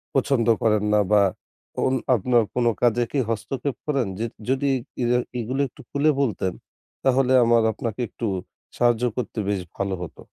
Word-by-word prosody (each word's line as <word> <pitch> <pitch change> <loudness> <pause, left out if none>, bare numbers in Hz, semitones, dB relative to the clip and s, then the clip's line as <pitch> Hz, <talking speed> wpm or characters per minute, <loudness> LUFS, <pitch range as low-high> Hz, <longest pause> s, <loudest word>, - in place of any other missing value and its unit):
পছন্দ 130 -3 +2
করেন 110 -3 +2
না 105 - +5
বা 105 -1 +6 0.6
এবং 130 - +1 0.2
আপনার 120 +2 +3
কোনো 120 -1 +3
কাজে 120 0 +3
কী 140 - 0
হস্তক্ষেপ 125 +5 -2
করেন? 140 -7 0
যে 115 - 0 0.2
যদি 135 +1 +1 0.3
ইর 120 - +1 0.3
এগুলো 130 +4 -1
একটু - - -16
খুলে 145 +2 +2
বলতেন 95 -7 -1 0.5
তাহলে 130 0 +3
আমার 115 0 +4
আপনাকে 115 +2 -5
একটু 115 - -6 0.5
সাহায্য 120 0 +3
করতে 120 -2 -3
বেশ 100 -2 0
ভালো 100 -1 -2
হতো। 90 - -8
120 Hz, 155 wpm, -24 LUFS, 110-130 Hz, 0.6 s, বা